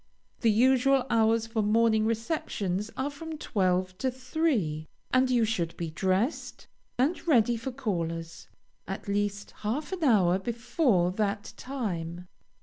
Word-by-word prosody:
The 230 Hz, -, +3 dB
usual 260 Hz, +4 st, +4 dB
hours 225 Hz, 0 st, +3 dB
for 225 Hz, -1 st, -1 dB
morning 220 Hz, +1 st, +3 dB
receptions 215 Hz, -, -2 dB
are 275 Hz, +2 st, -1 dB
from 315 Hz, +2 st, -7 dB
twelve 185 Hz, -7 st, 0 dB
to 260 Hz, -, +1 dB
three, 250 Hz, -, -1 dB, 0.3 s
and 255 Hz, 0 st, +4 dB
you 240 Hz, -3 st, +3 dB
should 175 Hz, -7 st, -2 dB
be 165 Hz, -2 st, -4 dB
dressed, 190 Hz, -, -1 dB, 0.3 s
and 285 Hz, +8 st, 0 dB
ready 240 Hz, -6 st, +4 dB
for 230 Hz, +4 st, -4 dB
callers, 170 Hz, -10 st, -4 dB, 0.4 s
at 195 Hz, +1 st, -6 dB
least 205 Hz, 0 st, -1 dB
half 250 Hz, -, -3 dB
an 370 Hz, -3 st, -3 dB
hour 190 Hz, -, +4 dB
before 235 Hz, -, +1 dB
that 205 Hz, +1 st, -2 dB
time. 180 Hz, -10 st, -4 dB
220 Hz, 135 wpm, -28 LUFS, 185-255 Hz, 0.4 s, usual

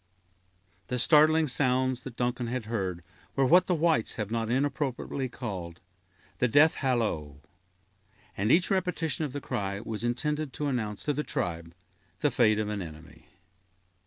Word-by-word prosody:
The 125 Hz, -, -2 dB
startling 155 Hz, +4 st, +5 dB
sounds 130 Hz, -1 st, +1 dB
that 130 Hz, -2 st, -9 dB
Duncan 120 Hz, 0 st, -1 dB
had 125 Hz, -1 st, -3 dB
heard 95 Hz, -6 st, -3 dB, 0.3 s
were 135 Hz, -, +3 dB
what 180 Hz, +6 st, +5 dB
the 180 Hz, -, +2 dB
whites 160 Hz, -7 st, +2 dB
have 105 Hz, -1 st, -4 dB
not 115 Hz, -1 st, -1 dB
inappropriately 135 Hz, 0 st, -1 dB
called 95 Hz, -9 st, -6 dB, 0.6 s
the 125 Hz, -, +3 dB
"death 145 Hz, +6 st, +5 dB
hallo"; 105 Hz, -, -1 dB, 1.0 s
and 105 Hz, +4 st, +1 dB
each 175 Hz, +3 st, +4 dB
repetition 170 Hz, -4 st, 0 dB
of 145 Hz, -, -5 dB
the 145 Hz, -, -3 dB
cry 100 Hz, -4 st, -3 dB
was 110 Hz, +1 st, -5 dB
intended 150 Hz, +4 st, -1 dB
to 150 Hz, -, -3 dB
announce 110 Hz, -7 st, -2 dB
to 150 Hz, -, 0 dB
the 145 Hz, -, -1 dB
tribe 85 Hz, -, -4 dB, 0.5 s
the 145 Hz, -, +2 dB
fate 110 Hz, -3 st, +3 dB
of 105 Hz, -1 st, -1 dB
an 105 Hz, -2 st, -3 dB
enemy. 80 Hz, -1 st, -11 dB
125 Hz, 155 wpm, -28 LUFS, 105-145 Hz, 1.0 s, startling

